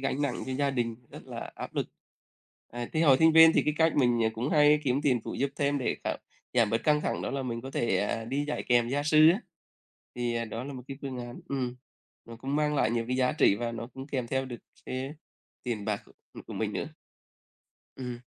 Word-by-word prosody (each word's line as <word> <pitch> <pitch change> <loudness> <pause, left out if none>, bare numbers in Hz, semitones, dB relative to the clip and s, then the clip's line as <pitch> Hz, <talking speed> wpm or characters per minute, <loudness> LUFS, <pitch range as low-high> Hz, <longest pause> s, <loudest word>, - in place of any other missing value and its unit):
gánh 135 +1 -1
nặng 135 -4 -1
cho 130 - -3
gia 140 +1 +1
đình 120 -3 -1
rất - - -11
là - - -6
áp - - -7
lực. - - -1 0.8
À, 120 0 -5
thì 160 - +2
hồi 140 -5 +7
sinh 160 0 +6
viên 160 0 +9
thì - - +3
cái 150 0 0
cách 160 0 +3
mình, 120 -4 +3
ờ, - - +4
cũng 125 +5 -2
hay 150 0 +5
kiếm 135 +2 +1
tiền 125 -5 +2
phụ - - -5
giúp 140 0 0
thêm 145 -1 +1
để 130 - -1
giảm - - -1 0.3
giảm 115 -4 +3
bớt 115 - +2
căng 150 -1 +4
thẳng - - -2
đó - - -2
là 135 -1 -2
mình 115 -2 -3
có 135 +2 -7
thể, 120 - +1
à, 110 +2 -1
đi 140 +5 -1
dạy 150 - -2
kèm 120 -1 +4
gia 140 +3 0
sư 155 +1 +7
á, 190 - +1 0.7
thì, 120 -1 -1
ờ, 115 0 -1
đó 115 +2 -5
là 140 - -6
một 125 - -7
cái 135 - -6
phương 130 -3 -4
án 120 0 -7
ừm, 125 -3 -2 0.5
nó 115 0 -10
cũng 135 +5 -3
mang 150 0 +1
lại 110 -6 +2
nhiều 115 0 0
cái 125 - 0
giá 130 -1 +2
trị - - +4
và 120 +1 -3
nó 115 0 -5
cũng 135 +1 -7
kèm 130 -4 -2
theo 130 +2 -1
được 120 -3 -7 0.3
cái, 130 0 -3
à, 150 - -9 0.5
tiền 115 -5 -3
bạc 105 -1 -2 0.4
của - - -8
mình - - -2
nữa. - - -3 1.1
Ừm. 125 -2 -5
130 Hz, 245 wpm, -29 LUFS, 120-145 Hz, 1.1 s, viên